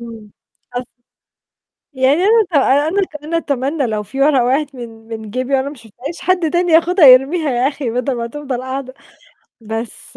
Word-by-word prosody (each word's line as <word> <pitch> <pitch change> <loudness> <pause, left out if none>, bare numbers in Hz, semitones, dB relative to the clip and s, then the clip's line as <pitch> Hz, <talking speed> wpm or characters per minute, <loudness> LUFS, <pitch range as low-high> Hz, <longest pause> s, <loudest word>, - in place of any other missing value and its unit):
إمم. 225 -3 -10 0.5
أص 250 0 -4 1.0
يعني 260 +1 +2
أنا 445 +1 +4
ت - - -27
أنا 290 +6 +3 0.2
أنا 335 +2 -2
أتمنى 280 -1 -1
لو 215 -2 -2
في 270 +6 -7
ورقة 275 -3 +4
وقعِت 275 +3 0
من 225 -2 -10
من 220 -2 -7
جَيبي 255 +4 -2
وأنا 270 +1 +1
ما 290 - -8
شُفتهاش، 245 +7 -9
حد 360 -3 +1
تاني 350 0 +1
ياخدها 335 0 +5
يرميها، 275 +5 +5
يا 250 +1 +1
أخي 280 -4 -4
بَدَل 250 +3 -1
ما 235 0 -3
تفضل 265 -1 -5
قاعدة، 260 0 -5 0.7
بس 225 +1 -7
265 Hz, 170 wpm, -17 LUFS, 240-300 Hz, 1.0 s, ياخدها